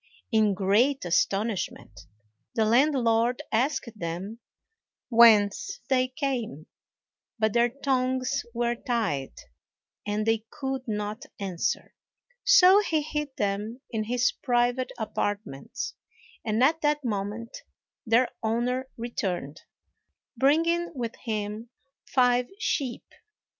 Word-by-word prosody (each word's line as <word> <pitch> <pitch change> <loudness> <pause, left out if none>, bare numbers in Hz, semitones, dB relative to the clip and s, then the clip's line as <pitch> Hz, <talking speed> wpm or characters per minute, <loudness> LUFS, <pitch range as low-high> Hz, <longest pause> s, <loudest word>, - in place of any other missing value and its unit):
In 215 -3 +3
great 210 +7 +2
astonishment, 185 - -1 0.5
the 220 - +3
landlord 240 -1 +3
asked 260 +1 0
them 180 +7 -5 0.7
whence 230 - +5
they 255 -1 +3
came; 255 - -3 0.7
but 220 -2 +1
their 240 0 +4
tongues 260 -1 0
were 235 0 0
tied, 220 - -2 0.7
and 210 +1 -1
they 225 -1 +1
could 265 -1 -4
not 210 0 -4
answer, 190 -4 -2 0.5
so 390 -6 +7
he 320 -7 0
hid 300 -2 -4
them 210 +4 -2
in 215 -1 -2
his 245 +2 +2
private 245 0 0
apartments, 205 - -3 0.5
and 220 +2 +1
at 320 +4 +3
that 295 -2 +1
moment 210 +2 -4 0.4
their 240 +1 +3
owner 245 +4 -1
returned, 190 - -4 0.7
bringing 335 +5 +2
with 235 -3 -4
him 215 +1 -3 0.4
five 250 -1 +3
sheep. 270 - -2
235 Hz, 100 wpm, -27 LUFS, 210-260 Hz, 0.7 s, so